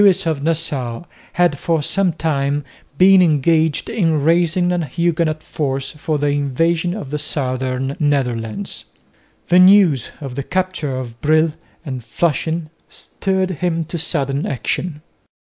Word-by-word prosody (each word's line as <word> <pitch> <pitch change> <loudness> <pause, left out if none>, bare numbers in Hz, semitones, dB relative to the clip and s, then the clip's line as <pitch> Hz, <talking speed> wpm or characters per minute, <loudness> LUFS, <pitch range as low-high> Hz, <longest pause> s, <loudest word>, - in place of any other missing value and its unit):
Lewis 195 -2 +4
of 160 -4 -1
Nassau 145 -6 -2 0.3
had 175 -5 +2
for 165 -3 0
some 195 +4 +1
time 145 -3 -1 0.3
been 190 +2 +7
engaged 160 -1 +2
in 165 -8 +1
raising 175 +2 +2
a 175 -1 0
Huguenot 155 +1 -1
force 135 -2 -3
for 150 0 -2
the 145 0 0
invasion 160 +5 0
of 170 -11 -7
the 150 - -2
southern 130 -2 -2
Netherlands. 135 - -1 0.6
The 180 - +6
news 185 - +5
of 135 -4 -6
the 140 - -3
capture 180 -4 -2
of 120 -2 -7
Brill 155 +1 +3 0.3
and 130 -4 -5
Flushing 160 +5 -1 0.2
stirred 190 -1 -2
him 165 -2 0
to 170 +2 -5
sudden 140 -4 -1
action. 150 +4 -3
155 Hz, 135 wpm, -19 LUFS, 140-175 Hz, 0.6 s, been